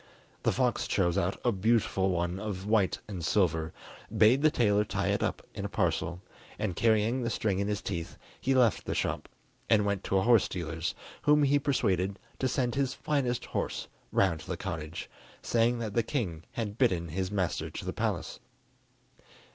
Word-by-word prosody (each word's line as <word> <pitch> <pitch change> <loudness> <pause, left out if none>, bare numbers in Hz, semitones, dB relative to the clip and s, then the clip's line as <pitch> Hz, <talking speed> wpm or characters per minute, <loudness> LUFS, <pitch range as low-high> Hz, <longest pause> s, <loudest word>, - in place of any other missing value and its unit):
The - - +2
fox - - +1
chose 85 -1 +1
out 90 +3 0
a 120 - +4
beautiful 100 -2 +2
one 90 +1 -1
of 100 -3 -4
white 105 -3 +2
and 95 -5 -5
silver, 80 -3 +1 0.5
bade 120 +6 +6
the 155 - +6
tailor 105 -7 +3
tie - - -1
it - - +1
up - - -2
in - - -5
a - - -3
parcel, 85 +2 -1 0.3
and 95 -5 -2
carrying 115 +2 +2
the 115 - -1
string 100 -4 0
in 100 - 0
his 105 -2 -2
teeth, 85 -1 -4 0.2
he 135 +1 +1
left 125 -4 +3
the - - -2
shop, - - -2 0.4
and 105 -2 +4
went 100 -1 -1
to 95 - +1
a 95 - +3
horse 115 -3 +5
dealer's, 80 -1 -3 0.3
whom 150 0 +4
he 145 +1 +4
persuaded 100 -9 +1 0.2
to 130 - +1
send 125 -1 0
his 135 -1 0
finest 130 -5 -1
horse - - -3 0.2
round 85 -5 +2
to - - -12
the - - -3
cottage, 80 +1 -5 0.4
saying 120 +1 +2
that 110 -3 -4
the 115 - +3
king 100 - -3
had 110 -2 -4
bidden 90 -10 +2
his 95 +3 -2
master 95 -4 -1
to - - -7
the - - -3
palace. - - -2
105 Hz, 185 wpm, -30 LUFS, 90-120 Hz, 0.5 s, bade